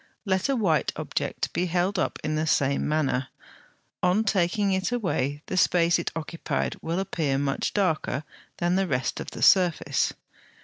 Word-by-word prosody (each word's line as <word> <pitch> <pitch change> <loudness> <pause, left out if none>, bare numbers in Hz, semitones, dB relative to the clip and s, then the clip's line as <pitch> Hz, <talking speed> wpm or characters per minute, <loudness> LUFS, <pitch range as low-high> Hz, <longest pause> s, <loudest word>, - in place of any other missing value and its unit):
Let 190 +4 +1
a 275 - +2
white 185 -10 +1
object - - -3
be 180 - 0
held 180 +3 0
up - - -1
in 155 - -1
the 155 +1 0
same 140 -2 +1
manner: 135 -4 0 0.7
on 180 +4 +3
taking 200 0 +1
it 190 +3 0
away 150 - -1
the - - -4
space 175 -1 +3
it 170 - -3
occupied 165 +1 -3
will 165 +2 -2
appear 155 -7 -1
much 140 0 -1
darker 160 -7 0 0.3
than 175 +1 +1
the 195 0 +1
rest 130 -4 -1
of - - -5
the - - -6
surface. 180 -4 +4
175 Hz, 165 wpm, -26 LUFS, 155-190 Hz, 0.7 s, surface